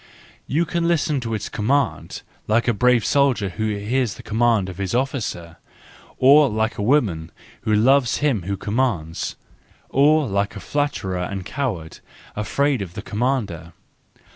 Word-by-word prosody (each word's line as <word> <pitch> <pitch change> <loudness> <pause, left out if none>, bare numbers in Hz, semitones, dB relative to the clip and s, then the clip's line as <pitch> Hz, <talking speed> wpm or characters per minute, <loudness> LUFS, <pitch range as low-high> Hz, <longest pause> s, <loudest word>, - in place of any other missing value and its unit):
You 160 +6 +1
can 170 0 -1
listen 155 -4 +1
to 115 -3 -3
its 105 -1 -4
command 135 +7 -1 0.2
like 115 +3 +2
a 120 - +3
brave 125 +1 +3
soldier 135 -8 +2
who 110 +5 -3
hears 115 +2 -1
the 125 - -12
command 115 -3 +1
of 95 0 -8
his 100 +3 -2
officer. 115 - -3 0.6
Or 140 +2 +6
like 110 0 -1
a - - 0
woman 100 - +1 0.3
who 110 - +1
loves 125 +3 +3
him 140 -9 +1
who 100 +3 -3
commands. 105 -7 -2 0.5
Or 150 +2 +4
like 100 0 -1
a - - -6
flatterer 120 -10 -2
and 95 +1 -4
coward, 105 - -4 0.4
afraid 135 +5 0
of 90 -3 -7
the 100 - -6
commander. 105 -9 -2
115 Hz, 150 wpm, -22 LUFS, 100-135 Hz, 0.6 s, Or